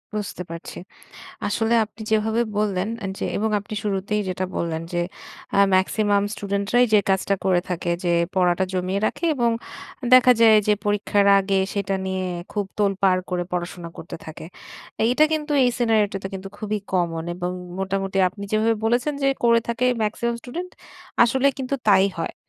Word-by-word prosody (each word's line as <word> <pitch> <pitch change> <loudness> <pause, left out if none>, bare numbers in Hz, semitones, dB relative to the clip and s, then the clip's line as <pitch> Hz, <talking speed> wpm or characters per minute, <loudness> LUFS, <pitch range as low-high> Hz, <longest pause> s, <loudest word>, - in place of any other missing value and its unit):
বুঝতে 200 -3 -4
পারছি। 165 0 -8 0.7
আসলে 225 +1 +1
আপনি 220 +1 -19
যেভাবে 220 +2 +2 0.2
বললেন 200 -1 0 0.2
আ - - -1
যে, - - -3
এবং 220 +2 0
আপনি 210 +1 -8
শুরুতেই 205 +1 -1
যেটা 185 0 -2
বললেন। 165 -1 -2
যে, 175 - 0 0.6
আ - - +3 0.2
ম্যাক্সিমাম 200 +2 +2
স্টুডেন্টরাই 200 +4 +1
যে, 210 - +7
কাজটা 195 +1 +1
করে 185 -2 +3
থাকে। 175 -1 -2
যে, 175 - +2 0.2
পড়াটা 180 0 +2
জমিয়ে 185 +2 -1
রাখে - - -3
এবং 240 -3 +2 0.6
দেখা 255 0 +8
যায় 220 -1 +7
যে, 210 - +4
পরীক্ষার 205 -1 +2
আগে 195 0 +1
সেটা 195 -1 -1
নিয়ে 190 0 -2 0.3
খুব 205 -1 -1
তোলপাড় 195 -2 +2
করে 175 -1 -1
পড়াশোনা 175 -1 -4
করতে 165 - -8
থাকে। 160 0 -9 0.6
এইটা 250 +6 +4
কিন্তু 300 -1 -1
এই 250 - +4
সিনারিওটা 215 -4 +2
তো - - -2
কিন্তু 190 0 -6
খুবই 215 0 -2
কমন 165 -3 0
এবং 180 0 -3 0.3
মোটামুটি 195 0 -2
আপনি 200 +2 -11
যেভাবে 220 +1 +3
বলেছেন 245 +6 +1
যে, 275 - +3 0.2
করে 230 0 +5
থাকে 235 +2 0 0.2
ম্যাক্সিমাম 235 +3 -1
স্টুডেন্ট। 350 +10 -6 0.5
আসলে 260 +3 +3
কিন্তু 265 +1 -2 0.2
তাই 195 0 +6
হয়। 165 - -3
200 Hz, 165 wpm, -23 LUFS, 185-225 Hz, 0.7 s, দেখা